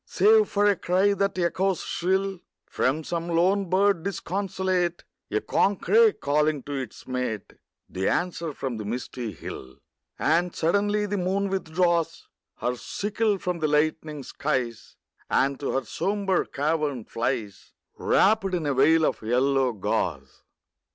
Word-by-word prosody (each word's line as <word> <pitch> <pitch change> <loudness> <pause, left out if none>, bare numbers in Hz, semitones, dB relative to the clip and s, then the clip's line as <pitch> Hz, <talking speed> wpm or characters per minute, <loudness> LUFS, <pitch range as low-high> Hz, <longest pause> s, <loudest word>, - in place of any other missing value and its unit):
Save 435 0 +4
for 205 0 +2
a 205 -1 +4
cry 190 +3 +2
that 200 -1 -1
echoes 185 +1 0
shrill 190 +1 -1 0.3
From 150 +5 0
some 170 +1 -3
lone 185 +3 +2
bird 195 -1 +3
disconsolate; 185 -1 -2 0.3
A - - 0
corncrake 425 - +3
calling 150 -1 +1
to 145 - -6
its 135 -2 -6
mate; 125 -5 -3 0.3
The 95 +1 -1
answer 170 -2 -1
from 135 -4 -4
the 110 - -5
misty 120 +1 -4
hill. 65 -6 -9 0.4
And 170 +3 +1
suddenly 205 +5 +1
the 205 -1 -2
moon 195 +2 0
withdraws 170 -2 0 0.3
Her 125 0 -2
sickle 210 - -1
from 180 -2 -3
the 155 - +1
lightening 150 -1 0
skies, 125 -6 -3 0.3
And 140 0 +1
to 140 - -3
her 135 -1 -1
sombre 195 - 0
cavern 145 -4 -1
flies, 115 -4 -3 0.2
Wrapped 195 -2 +2
in 165 -3 -2
a 145 - +1
veil 155 +4 +4
of - - -1
yellow 130 +3 +2
gauze. 105 -5 -3
170 Hz, 140 wpm, -26 LUFS, 135-195 Hz, 0.4 s, Save